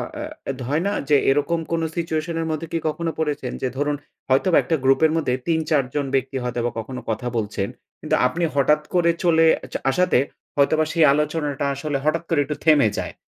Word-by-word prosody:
অ্যা 300 - -6
হয়না 155 +10 0 0.2
যে 150 - +6
এরকম 145 +5 +1
কোন 165 -1 +1 0.2
situation 165 0 -2
এর 160 - -2
মধ্যে 155 +1 -3
কি - - +2
কখনো 165 +1 -2
পরেছেন? 145 -5 -2
যে 130 - 0
ধরুন 145 +1 0 0.3
হয়তোবা 150 +7 +3
একটা 165 - 0
গ্রুপের 145 +4 +4
মধ্যে 160 -6 0
৩-৪ 160 -3 +2
জন 145 -1 0
ব্যক্তি 135 0 -1
হয়তোবা 120 -1 -2
কখনো 125 +3 -6
কথা 125 +3 -2
বলছেন। 105 -2 -2 0.3
কিন্তু - - 0
আপনি 170 +7 -3
হঠাৎ 150 +2 +3
করে 170 -1 +4
চলে 165 -2 +4 0.3
চ - - -9 0.2
আসাতে, 180 -2 +3 0.4
হয়তোবা 155 +2 +3
সেই 165 -3 +5
আলোচনা 150 +1 0 0.3
আসলে 140 0 -2
হঠাৎ 165 +2 +1
করে 165 - +2
একটু 150 +1 -3
থেমে 150 -8 +6
যায়। - - -4
150 Hz, 180 wpm, -22 LUFS, 135-165 Hz, 0.4 s, যে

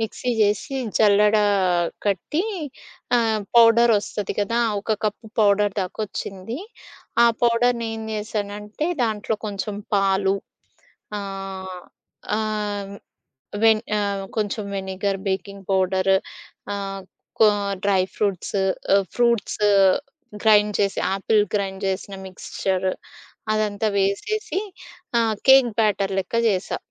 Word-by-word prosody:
Mixie 225 +3 -2
జేసి, 210 +6 +1 0.2
జల్లడ 210 0 +5 0.7
కట్టి, 205 - 0 0.7
ఆహ్, 225 -2 +1 0.2
పౌడరోస్తది 230 -3 +4
గదా! 230 +4 0 0.2
ఒక 215 - -6
కప్పు 215 +2 -2
పౌడర్ 205 -1 +3
దాకొచ్చింది. 195 - -5 0.7
ఆ - - +7 0.2
పౌడర్‌ని 235 0 +2
ఏం 220 - -6
జేసానంటే, 210 +4 -4 0.2
దాంట్లో 220 -1 -1
కొంచెం 205 0 -4 0.2
పాలు, 195 0 +2 0.9
ఆహ్, 195 -2 -6 0.6
ఆహ్, 210 -2 -3 0.7
వెన్ 220 -1 +5 0.2
ఆహ్ 200 -1 -2
కొంచెం 210 0 -1
వెనిగర్, 195 +1 -2
బేకింగ్ 195 +1 -4
పౌడర్ 190 0 +2 0.6
ఆహ్, 195 -1 -5 0.4
కొ 220 - +8 0.4
డ్రై 195 -2 +3
ఫ్రూట్స్, 200 -1 -1 0.4
ఆహ్, 195 - +2
ఫ్రూట్స్, 235 -3 +1 0.8
గ్రైండ్ 210 -1 +5
చేసి 200 -1 0 0.2
ఆపిల్ 210 +2 +2
గ్రైండ్ 195 -1 -2
జేసిన 190 +1 -3
మిక్స్చర్ 190 0 -2 0.6
అదంతా 215 0 0
వేసేసి 390 - -1 0.6
ఆహ్, 225 -2 +2
కేక్ 265 -2 +8
బ్యాటర్ 200 -2 +1
లెక్క 190 +5 -4
జేసా. 190 -2 -1
205 Hz, 100 wpm, -23 LUFS, 195-220 Hz, 0.9 s, కొ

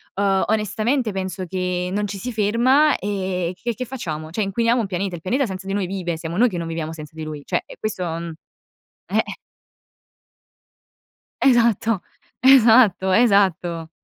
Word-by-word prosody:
ehm, 195 -1 +2
onestamente 220 +3 0
penso 185 -1 -4
che 180 0 -2
non 205 +2 -1
ci 200 0 -6
si 250 +6 -5
ferma 245 +8 +3
e 185 -3 -2
che 235 0 -1
che 255 - -4
facciamo, 160 -12 -5
cioè 195 - -2
inquiniamo 230 +5 +1
un 210 - -3
pianeta. 190 0 -3
Il 165 - -10
pianeta 255 - 0
senza 190 -3 -7
di 195 - -2
noi 200 -2 0
vive, 175 -3 -3
siamo 165 +2 -5
noi 245 +1 +4
che 180 - -5
non 170 -1 -4
viviamo 165 -1 -4
senza 155 -2 -10
di 160 - -6
lui, 150 -2 -7
cioè - - -1
è - - -12
questo 215 -4 -3 1.0
eh! - - +1 2.2
Esatto. 230 -5 +3 0.4
Esatto, 230 -7 +6
esatto. 185 -7 +2
195 Hz, 160 wpm, -21 LUFS, 180-230 Hz, 2.2 s, Esatto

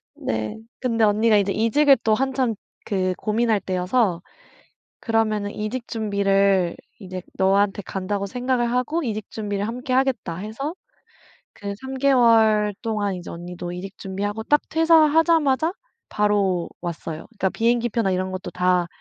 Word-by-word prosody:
네. 110 - -3 0.2
근데 230 -3 0
언니가 215 +1 +4
이제 200 0 +1
이직을 270 +7 +4
또 220 - +3
한참 260 -2 0 0.3
그 185 -2 0
고민할 220 0 +1
때여서 185 0 0 0.8
"그러면은 215 -3 0
이직 230 +3 -4
준비를 200 -4 +1 0.2
이제 185 -2 -7 0.2
너한테 195 +1 +2
간다고 195 +2 -3
생각을 245 +2 -1
하고 290 +7 0
이직 215 -4 -4
준비를 205 -1 -3
함께 250 +2 -4
하겠다." 255 -10 0
해서 220 - -5 0.8
그 200 -1 -6
3 265 0 -6
개월 225 -6 +4
동안 210 -4 -1
이제 175 - -8
언니도 175 +1 -7
이직 185 +2 -7
준비하고 205 +3 -4
딱 295 +5 +3
퇴사하자마자 320 -1 +4 0.4
바로 200 -4 +1
왔어요. 165 -2 -5
그니까 200 -4 -1
비행기 235 +3 +1
표나 220 -4 0
이런 185 0 -1
것도 185 0 -6
다 180 -1 +1
210 Hz, 305 characters per minute, -23 LUFS, 190-245 Hz, 0.8 s, 언니가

